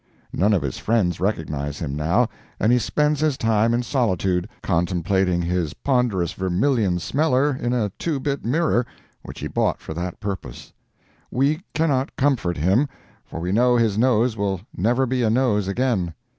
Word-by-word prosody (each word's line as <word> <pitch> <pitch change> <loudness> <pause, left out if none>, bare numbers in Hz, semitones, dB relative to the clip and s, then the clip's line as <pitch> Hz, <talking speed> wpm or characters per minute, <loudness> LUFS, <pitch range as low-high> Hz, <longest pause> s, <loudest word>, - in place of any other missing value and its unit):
None 105 +3 +2
of 95 - +1
his 65 -3 -4
friends 100 -7 +1
recognize 75 -7 -2
him 70 -4 -4
now, 85 +11 +2 0.3
and 110 - +3
he 125 - +4
spends 150 +5 +1
his 155 -3 +1
time 115 0 +2
in 120 +1 +1
solitude, 95 - 0
contemplating 90 0 +1
his 85 -3 -1
ponderous 120 - 0
vermillion 95 +1 +1
smeller 140 - +1
in 120 -1 -2
a 115 -5 0
two 155 -5 -1
bit 140 +1 -2
mirror, 135 -1 +1 0.4
which - - -10
he - - -2
bought - - 0
for - - -7
that 90 +2 -5
purpose. 100 -2 -6 0.6
We 145 +6 +1
cannot 145 -4 0
comfort 125 - +1
him, 95 - +2 0.3
for - - -8
we 90 +2 -2
know 120 +4 +4
his 115 -4 +2
nose 120 0 +2
will 100 -3 -1
never 120 +8 +2
be 130 0 -1
a 115 - +2
nose 110 -4 +2
again. 100 -6 0
110 Hz, 165 wpm, -22 LUFS, 90-130 Hz, 0.6 s, he